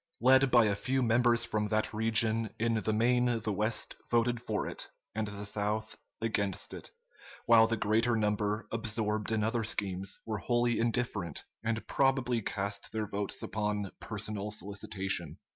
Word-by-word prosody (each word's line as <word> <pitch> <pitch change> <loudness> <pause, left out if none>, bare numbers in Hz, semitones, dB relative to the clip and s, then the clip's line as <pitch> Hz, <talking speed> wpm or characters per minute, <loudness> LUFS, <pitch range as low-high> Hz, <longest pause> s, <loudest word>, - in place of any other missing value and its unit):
Led 130 +2 +5
by 120 -2 +6
a 105 - +2
few 130 +5 0
members 120 0 +3
from 105 -2 -1
that 110 +1 0
region, 110 0 +2
in 115 +1 +1
the 110 0 0
main 120 +2 +2
the 105 0 -1
West 110 +3 -1
voted 120 0 +2
for 110 -3 -2
it - - -5 0.2
and 110 0 -2
the 100 0 -5
South 105 +2 -2 0.3
against 100 -4 -1
it; - - -6 0.6
while 115 -1 +7
the 115 0 -1
greater 115 +3 +2
number, 105 0 0
absorbed 110 -1 0
in 110 -1 +1
other 115 +1 0
schemes, 95 -2 -1
were 110 -2 -3
wholly 120 +4 +1
indifferent, 115 - -1 0.2
and 110 0 -1
probably 130 -3 +1
cast 100 -1 -3
their 110 -1 -2
votes 100 0 -2
upon 105 -2 -2
personal 105 -1 -4
solicitation. 95 -4 -3
110 Hz, 155 wpm, -31 LUFS, 105-115 Hz, 0.6 s, while